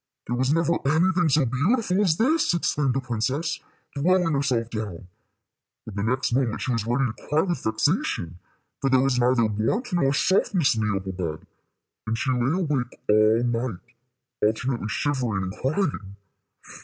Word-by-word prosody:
"There 120 - -2
was 130 +2 +1
never 165 +1 +1
anything 170 +4 +2
so 145 0 +3
beautiful 185 - +1
as 170 -6 +2
this!" 285 - +2
exclaimed 145 -6 0
the 135 - 0
princess, 130 +7 -2 0.3
throwing 170 +3 +2
herself 130 -5 0
down; 100 -5 -6 0.8
but 105 - -9
the 100 - -2
next 125 +3 0
moment 125 -3 0
she 130 - -2
was 115 -1 -2
ready 125 0 +1
to - - -17
cry 150 +2 +2
with 175 -8 -2
vexation, 90 -5 -1 0.4
for 135 - 0
there 130 -1 +4
was 135 -2 +1
neither 120 -1 +3
warmth 110 - -1
nor 140 -6 +2
softness 175 0 +2
in 110 - -2
the 100 - 0
opal 95 0 -5
bed, 85 -4 -5 0.6
and 110 +1 -1
she 130 - -1
lay 125 +1 +1
awake 145 -8 -2
all 110 +2 +4
night, 120 -5 -1 0.6
alternately 110 +1 0
shivering 120 -5 -1
and 95 0 -4
crying. 135 - -2
130 Hz, 165 wpm, -25 LUFS, 110-155 Hz, 0.8 s, there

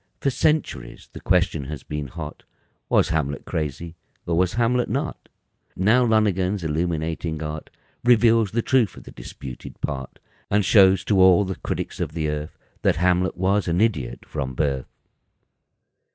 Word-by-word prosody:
For 140 - +1
centuries 125 - -1
the - - -9
question 70 - +1
has 75 0 -7
been 75 -1 -5
hot: - - -8 0.5
Was - - +3
Hamlet 75 -3 -2
crazy, 80 +2 -4 0.3
or 85 - 0
was 90 +2 +2
Hamlet 120 +1 +1
not? 140 +2 -3 0.5
Now, 110 +7 +4
Lonergan's 105 -4 +1
illuminating 80 0 -2
art 75 0 -6 0.3
Reveals 115 -2 +4
the 115 +3 -1
truth 125 -6 +2
of - - -11
the - - -12
disputed 60 +1 -10
"part," 65 -3 -5 0.3
And 105 -1 +2
shows 95 -3 +5
to 100 -3 +2
all 95 +2 +6
the 95 0 -4
critics - - -4
of 75 - -3
the 80 -2 -1
earth 75 0 -5 0.2
That - - +2
Hamlet 90 +1 +1
was 95 +2 +1
an 85 +1 +1
idiot 75 - -1
from 65 -1 -4
birth! 70 -3 -1
90 Hz, 150 wpm, -23 LUFS, 75-105 Hz, 0.5 s, all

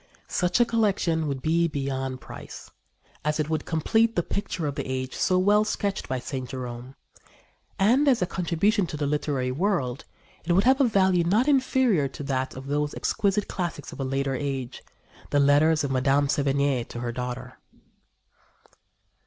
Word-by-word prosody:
Such 180 +4 +1
a 240 - +6
collection 195 -9 +1
would 135 -2 -4
be 170 +2 +2
beyond 135 -3 -3
price, - - -10 0.5
as 150 +1 0
it 155 +1 -1
would 155 - -1
complete 225 +8 +1
the 175 - +1
picture 185 -4 -3
of 145 - -1
the - - -3
age 130 0 -3
so 185 - +2
well 205 +3 +4
sketched 200 -2 -2
by 130 - -1
St. 130 0 -5
Jerome; 125 0 -7 0.8
and, 245 +9 +3
as 260 -4 +4
a 180 - +1
contribution 180 +3 0
to 150 - -5
the 145 - -1
literary 140 -3 -1
world, 140 -5 -1 0.4
it 175 - +1
would 190 +3 +4
have 265 +3 +4
a - - +5
value 190 -4 +3
not 210 - +2
inferior 260 - +3
to 135 +2 -8
that 130 -1 -2
of 130 +1 -8
those 145 +1 -1
exquisite 200 0 0
classics 175 -5 -4
of - - -11
a - - -1
later 135 +1 -1
age 135 -2 -4 0.5
the 145 - +2
letters 145 +2 +4
of 140 - -2
Madame 135 +2 +2
Sevigné 140 -3 +1
to 120 - -7
her 120 -1 -2
daughter. 125 +1 -6
150 Hz, 170 wpm, -26 LUFS, 135-190 Hz, 0.8 s, a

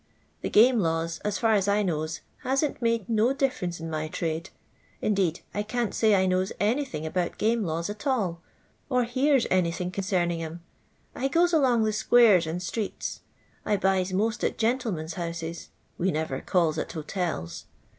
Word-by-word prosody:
The - - -2
game 240 +3 +6
laws, 165 -2 -1
as 205 -1 -2
far 225 +3 +2
as 200 -2 +2
I 205 +1 +3
knows, 155 -3 -2 0.2
hasn't 270 +2 -1
made 230 -4 +1
no 230 +4 +2
difTervnco 180 -12 -1
in 165 - -5
my 155 0 -2
trade. 165 +2 -3 0.5
Indeed, 190 -5 0
I 205 - -1
can't 235 +1 -2
say 215 -2 +4
I 190 -1 +3
knows 185 +1 +1
anything 235 - 0
about 175 +2 -2
game 225 +1 +1
laws 165 -1 -2
at 210 +7 -6
all, 195 -11 0 0.5
or 250 -2 +2
hears 260 +2 +2
anything 180 0 +1
consiirning 180 -3 -1
'om. 165 +2 -7 0.5
I 270 - -1
gous 345 +5 +2
along 255 -7 +4
the 215 0 +1
squares 215 -6 +5
and 175 +3 -3
streets. 205 +4 -4 0.4
I 210 - +1
buys 190 -1 +1
most 220 +5 0
aft - - 0
gentlemen's 225 -9 -1
houses. 170 0 -5 0.3
We 185 - +2
never 155 -5 -2
calls 165 -4 +1
at - - -4
hotels. 155 - -4
190 Hz, 165 wpm, -27 LUFS, 170-230 Hz, 0.5 s, game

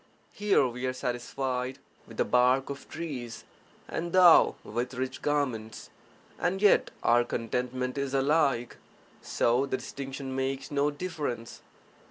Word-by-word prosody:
Here 205 -10 +3
we 125 +1 -4
are 130 - -1
satisfied 125 +1 -3 0.3
with - - -12
the - - +2
bark 125 +2 +3
of 140 - -9
trees 130 -9 -6 0.4
and 170 +1 -4
thou 180 -3 +7
with 120 +4 -4
rich 130 0 -4
garments; 130 -7 -2 0.5
(and 190 +2 0
yet) 205 0 +4
our 120 +1 +4
contentment 125 +3 -3
is 140 -1 -2
alike, 135 -3 +1 0.4
(so) 125 +4 +1
the 130 - -1
distinction 135 -1 -6
makes 135 +2 -2
no 145 0 +2
difference. 145 -7 -5
130 Hz, 130 wpm, -28 LUFS, 125-145 Hz, 0.5 s, thou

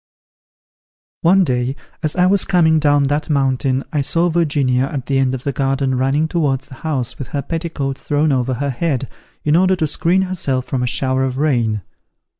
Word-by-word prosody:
One 190 +3 +5
day 125 -3 -1 0.3
as 155 -2 -2
I 180 -1 +3
was 195 +1 +4
coming 160 -3 +3
down 145 -1 +3
that 145 +3 -1
mountain, 135 -2 +1
I 150 - +1
saw 165 +5 +1
Virginia 145 -6 +1
at 135 -2 -5
the 135 -1 +1
end 130 -1 +1
of 130 - -8
the 140 - -1
garden 135 0 0
running 135 +5 +1
towards 145 -6 -1
the - - -11
house 140 -7 -3
with 135 - -5
her 140 +1 -3
petticoat 155 -4 -3
thrown 150 +1 +1
over 130 -1 0
her 140 +3 -2
head, 135 -1 -1 0.4
in 150 +1 +2
order 185 +2 +4
to 170 -3 0
screen 170 +5 +1
herself 140 -9 -2
from 130 -1 -2
a 125 - 0
shower 130 +1 0
of 130 -1 -2
rain. 120 -9 0
140 Hz, 190 wpm, -18 LUFS, 130-160 Hz, 0.4 s, One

